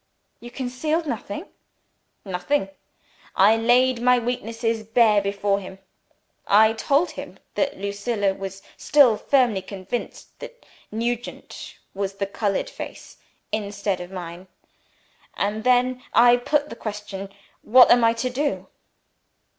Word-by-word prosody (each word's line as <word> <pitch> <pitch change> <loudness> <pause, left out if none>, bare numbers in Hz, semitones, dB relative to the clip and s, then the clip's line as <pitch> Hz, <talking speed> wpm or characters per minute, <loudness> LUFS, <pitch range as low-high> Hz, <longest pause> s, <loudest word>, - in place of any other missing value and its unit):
"You 240 - -10
concealed 275 +7 -2
nothing?" 240 - -5 0.8
"Nothing. 195 +5 -1 0.7
I 205 +3 +6
laid 245 +2 +3
my 250 0 +4
weakness 235 -1 -4 0.3
bare 215 -4 +5
before 200 0 0
him. 190 -1 -10 0.7
I 220 +2 +5
told 280 +9 +1
him - - -9 0.2
that 285 - -1
Lucilla 200 +1 -1
was 195 0 -8
still 275 -7 +5
firmly 235 -3 +2
convinced 190 +4 -7
that - - -11 0.3
Nugent's 235 +2 -5 0.2
was 195 0 -3
the 200 0 -2
discolored 200 0 -2
face, - - -9 0.3
instead 200 -3 -2
of 175 - -8
mine. 180 0 -8 0.9
And 210 +2 -2
then 250 0 +2
I 240 +1 +7
put 290 +4 0
the - - -8
question 210 -3 -6 0.3
What 250 +3 +6
am 240 -1 +5
I 230 0 +4
to 235 +2 -2
do?" 285 +3 -2
225 Hz, 125 wpm, -23 LUFS, 200-250 Hz, 0.9 s, I